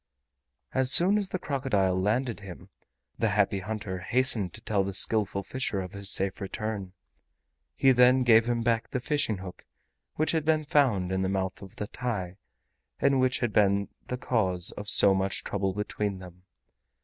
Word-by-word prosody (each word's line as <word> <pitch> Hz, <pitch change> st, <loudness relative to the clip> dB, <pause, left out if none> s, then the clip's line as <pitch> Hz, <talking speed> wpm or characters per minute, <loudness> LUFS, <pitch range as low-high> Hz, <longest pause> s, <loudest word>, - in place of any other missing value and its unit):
As 130 Hz, 0 st, +1 dB
soon 190 Hz, +8 st, +4 dB
as 200 Hz, -2 st, -3 dB
the -, -, -2 dB
crocodile 130 Hz, -, 0 dB
landed 110 Hz, +5 st, -1 dB
him, 95 Hz, -4 st, -11 dB, 0.5 s
the 115 Hz, -, +1 dB
Happy 105 Hz, -1 st, +1 dB
Hunter 100 Hz, -1 st, -5 dB
hastened 115 Hz, -3 st, +1 dB
to 110 Hz, -, -9 dB
tell 105 Hz, -4 st, 0 dB
the 95 Hz, 0 st, -4 dB
Skillful 100 Hz, -2 st, +1 dB
Fisher 120 Hz, -2 st, -3 dB
of 90 Hz, -1 st, -6 dB
his 100 Hz, 0 st, -3 dB
safe 95 Hz, +1 st, 0 dB
return. 100 Hz, -1 st, -5 dB, 0.8 s
He 135 Hz, -, +4 dB
then 125 Hz, +1 st, +5 dB
gave 115 Hz, -1 st, +5 dB
him 120 Hz, -1 st, 0 dB
back 115 Hz, -1 st, 0 dB
the 125 Hz, -, -2 dB
fishing 145 Hz, -5 st, -1 dB
hook 95 Hz, -1 st, -10 dB, 0.5 s
which 155 Hz, -, +1 dB
had 160 Hz, -2 st, 0 dB
been 155 Hz, 0 st, +1 dB
found 120 Hz, -12 st, +1 dB
in 95 Hz, 0 st, -1 dB
the 95 Hz, -, -1 dB
mouth 95 Hz, -1 st, -3 dB
of 95 Hz, -1 st, -12 dB
the 105 Hz, -, -4 dB
TAI 100 Hz, -6 st, -5 dB, 0.6 s
and 140 Hz, -1 st, +2 dB
which 130 Hz, -1 st, +1 dB
had 120 Hz, -4 st, -1 dB
been 100 Hz, -1 st, +2 dB, 0.2 s
the 125 Hz, -, -3 dB
cause 95 Hz, -8 st, -1 dB
of 105 Hz, 0 st, -3 dB
so 100 Hz, -, +8 dB
much 95 Hz, 0 st, -1 dB
trouble 100 Hz, -1 st, -2 dB
between 105 Hz, -1 st, -3 dB
them. 90 Hz, 0 st, -13 dB
105 Hz, 175 wpm, -27 LUFS, 95-125 Hz, 0.8 s, so